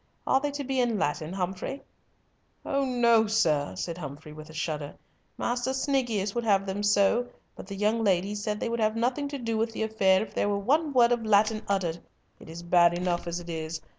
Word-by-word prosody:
Are 265 - +3
they 290 +1 -2
to 285 0 -4
be 265 0 -1
in 240 -3 +1
Latin, 155 -2 -2
Humfrey?" 190 +8 -4 0.8
"Oh 275 0 0
no, 235 -3 +3
sir," 160 -10 +1
said 170 0 -4
Humfrey, 150 0 -8
with 155 0 -11
a - - -10
shudder. 150 -2 -4 0.4
"Master 245 +2 -1
Sniggius 245 -8 0
would 240 - -2
have 200 -3 +3
had 195 - -11
them 195 +1 -3
so, 205 +4 +3 0.3
but - - -10
the 200 - -6
young 215 +3 +1
ladies 200 +1 +1
said 210 0 -2
they - - -2
would 235 0 -2
have 215 0 +1
nothing 250 +5 0
to 280 0 -5
do 230 -3 -2
with 225 0 -1
the 220 - -2
affair 195 -3 +3
if 210 -2 -11
there 205 - 0
were 200 - 0
one 290 +9 +1
word 245 -3 +4
of 240 -1 +1
Latin 215 0 +3
uttered. 180 -4 -1 0.4
It - - -13
is 165 +1 -8
bad 175 0 +4
enough 175 -1 -1
as 170 +1 -2
it 175 - -11
is. 160 -1 -4
205 Hz, 220 wpm, -27 LUFS, 175-235 Hz, 0.8 s, word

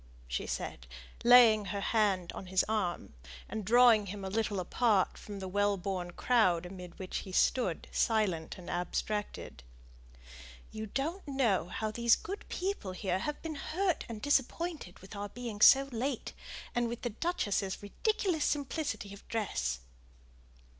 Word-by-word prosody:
she - - -3
said, - - -4 0.4
laying 235 -3 +7
her 200 +1 -3
hand 200 -4 +1
on 190 - -8
his 185 0 +2
arm, 195 - -2 0.3
and 220 - -4
drawing 230 -1 +6
him 195 +1 -6
a 190 - -4
little 210 -2 0
apart 200 +1 +2
from 205 -1 -8
the 190 -1 -5
well 205 +1 +1
born 185 -1 -3
crowd 180 -4 +2
amid 180 -1 -9
which 185 -1 -4
he 190 - -6
stood, 185 -2 +1
silent 200 -8 0
and 180 - -11
abstracted, 180 - -3 1.1
"you 220 0 -5
don't 315 - -3
know 235 - +1
how 215 +4 -3
these 235 +1 +4
good 395 +4 -7
people 365 - -3
here 185 -1 -1
have 295 +9 -3
been 325 -1 -3
hurt 350 +5 -1
and 220 -2 -7
disappointed 290 - 0
with 190 +3 -11
our 205 0 -4
being 235 -3 -6
so 270 +4 +9
late, 250 +2 -3 0.4
and 240 0 +1
with 235 +1 -6
the 240 - -1
duchess's 205 - -1
ridiculous 360 - 0
simplicity 275 -8 -2
of 200 - -14
dress." 65 - -2
210 Hz, 150 wpm, -32 LUFS, 190-245 Hz, 1.1 s, so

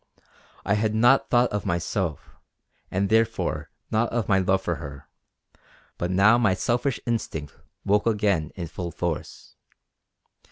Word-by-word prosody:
I 100 - +2
had 110 +1 0
not 120 +5 +4
thought 120 0 +3
of 105 -2 -2
myself, 85 -2 -2 0.5
and 100 +2 0
therefore 115 +2 0 0.2
not 110 +2 +1
of 120 -2 -1
my 95 -2 +3
love 95 0 +1
for 85 -3 -1
her; 70 -3 -9 0.9
but 85 - -1
now 105 +6 +5
my 105 -6 +3
selfish 120 +5 0
instinct 95 - -3 0.3
woke 105 +2 +2
again 100 -8 +1
in 90 - -4
full 85 +2 -5
force. - - -5
100 Hz, 135 wpm, -25 LUFS, 85-115 Hz, 0.9 s, now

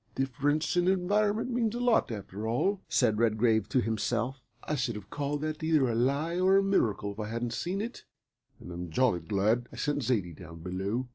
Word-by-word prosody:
"Difference 145 +4 0
of 175 0 +3
environment 205 +5 +1
means 235 -2 0
a - - -2
lot, 245 -2 +3
after 105 0 -5
all," 185 - 0
said 110 -4 +2
Redgrave 110 -2 +2
to 130 - +2
himself. 115 +4 -1 0.2
"I - - -3
should 125 -5 -1
have 105 -2 -9
called 145 0 -2
that 155 -1 -3
either 155 -4 +3
a 120 - 0
lie 140 +9 +1
or 190 +1 +5
a 195 - +4
miracle 110 - +1
if 100 - -11
I 105 - -3
hadn't 115 +1 -3
seen 190 +3 -2
it, 230 +3 -6 0.5
and - - -10
I'm 85 0 -6
jolly 110 +1 +2
glad 105 +8 0
I - - -11
sent 145 0 -1
Zaidie 110 -9 0
down 85 0 -11
below." 95 +8 -2
125 Hz, 200 wpm, -29 LUFS, 105-165 Hz, 0.5 s, or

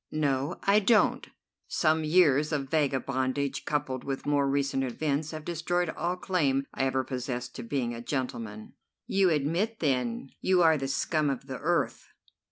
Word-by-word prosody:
"No, 140 -2 -1
I 200 +2 +5
don't. 215 +2 +3 0.4
Some 155 -1 +2
years 155 -3 +4
of 140 -3 -2
vagabondage 135 -2 0
coupled 135 -4 -2
with 135 -1 -4
more 145 -1 +2
recent 140 -1 0
events 145 +4 -1
have 155 -1 -7
destroyed 175 +1 -1
all 175 +1 -2
claim 145 -8 0
I 135 - 0
ever 130 0 +1
possessed 125 -2 -4
to - - -4
being 120 -1 -2
a 115 - -6
gentleman." 115 -5 -4 0.3
"You 195 -1 +3
admit, 170 +9 0
then, 125 -3 -1
you 185 -2 +3
are 160 -1 +6
the 135 - -2
scum 150 +2 0
of 135 -1 -3
the 130 -2 -6
earth." 170 +3 0
140 Hz, 160 wpm, -28 LUFS, 130-160 Hz, 0.4 s, are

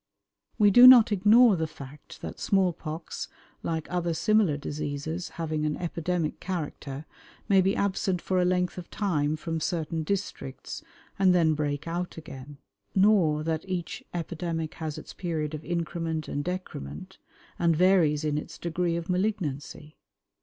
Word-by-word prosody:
We 205 -2 +5
do 245 +5 +10
not 245 -4 +9
ignore 210 +3 +6
the 160 -2 -1
fact 140 -1 -12
that - - -6
small 190 -3 +2
pox, 155 +1 -6 0.3
like 160 -2 -2
other 175 -2 -1
similar 215 -6 +3
diseases 150 +4 -4
having 155 -2 -2
an 150 -1 -1
epidemic 170 -1 -2
character, 155 -5 -5 0.4
may 195 -3 +5
be 195 +2 +1
absent 190 -2 0
for 185 +1 0
a - - +3
length 180 0 0
of 175 - -10
time 155 -7 0
from 165 +1 -3
certain 165 0 -2
districts 195 +5 -4 0.4
and 185 -2 +5
then 160 -3 +4
break 145 0 -2
out 175 +1 -3
again; 140 -2 -10 0.4
nor 190 -7 +4
that 160 0 -1
each 180 -3 -4
epidemic 165 -2 -3
has 155 -2 -5
its - - -9
period 160 -4 -3
of 155 0 -6
increment 165 -2 -3
and 145 - -3
decrement, 145 - -6 0.4
and 170 -1 +3
varies 165 -4 +4
in 150 -1 0
its - - -9
degree 170 0 -1
of 170 0 -4
malignancy. 180 -6 -3
165 Hz, 150 wpm, -27 LUFS, 155-185 Hz, 0.4 s, do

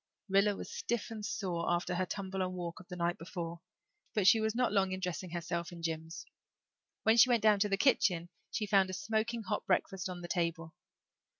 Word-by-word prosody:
Rilla 200 +1 +4
was - - -7
stiff 235 -1 -2
and 215 -2 -6
sore 185 -5 -2
after 175 +1 0
her 185 +1 0
tumble 190 0 -3
and 185 0 -1
walk 175 -2 -5
of 185 - -14
the 180 - -7
night 175 0 -1
before 170 -1 -6 0.5
but 210 -3 +2
she 225 - +7
was 220 0 0
not 250 -2 +2
long 195 -2 +2
in 185 - -3
dressing 180 -1 -3
herself 170 0 -3
and 170 -1 -10
Jims. 160 0 -4 0.8
When 220 +1 +5
she 250 +2 +8
went 235 -3 +3
down 210 -2 +5
to 205 +1 +2
the 195 - +1
kitchen 180 -8 +3 0.2
she 215 - -2
found 195 -2 +4
a - - -5
smoking 220 +3 -1
hot 195 - -2
breakfast 190 0 0
on 180 -1 -6
the 175 - -6
table. 170 -3 -2
185 Hz, 210 wpm, -33 LUFS, 175-210 Hz, 0.8 s, she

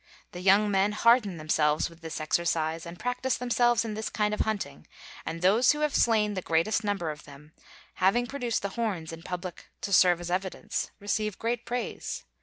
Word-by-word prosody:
The 180 - -8
young 200 +3 +4
men 195 +1 +2
harden 215 -4 +3
themselves 155 -1 +1
with 165 0 -16
this 160 0 -5
exercise, 160 0 0
and 170 +1 -8
practice 250 +3 -1
themselves 240 -2 +2
in 220 - -3
this 220 +1 -3
kind 210 -1 0
of - - -3
hunting, 205 - -3 0.4
and 165 +1 -4
those 225 +9 +5
who 300 - -5
have 300 -2 +1
slain 215 -3 +3
the 185 - -3
greatest 170 +7 +1
number 195 -6 -1
of 150 - -11
them, 145 +1 -14 0.5
having 200 +6 +3
produced 245 -4 -2
the 200 - -1
horns 195 -8 -3
in 165 - -9
public 180 0 -6
to 200 - -3
serve 180 -1 +6
as 175 0 -5
evidence, 190 +1 -2
receive 210 0 -1
great 235 +1 -2
praise. 245 +1 -4
200 Hz, 190 wpm, -28 LUFS, 170-225 Hz, 0.5 s, serve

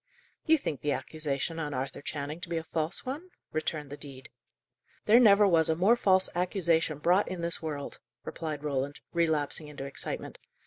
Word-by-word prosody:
"You 320 0 +6
think 150 - -4
the 145 -1 +1
accusation 155 +1 -3
on 150 -3 -3
Arthur 130 +2 -4
Channing 145 +2 -5
to 185 - -6
be 170 - -1
a 165 - -2
false 160 +2 -2
one?" 295 +8 -5 0.2
returned 155 -2 -3
the 145 - -6
dean. 135 -3 -10 0.8
"There 225 +3 +7
never 205 -3 +7
was 165 -4 +4
a 160 - +3
more 195 +8 +4
false 190 -5 +4
accusation 170 -4 +1
brought 175 +6 +3
in 185 -2 -4
this 170 0 -1
world," 150 -3 -5 0.3
replied 155 -3 -5
Roland, 140 -1 -2
relapsing 160 -2 +1
into 145 -2 -7
excitement. 140 - -5
160 Hz, 175 wpm, -29 LUFS, 145-180 Hz, 0.8 s, There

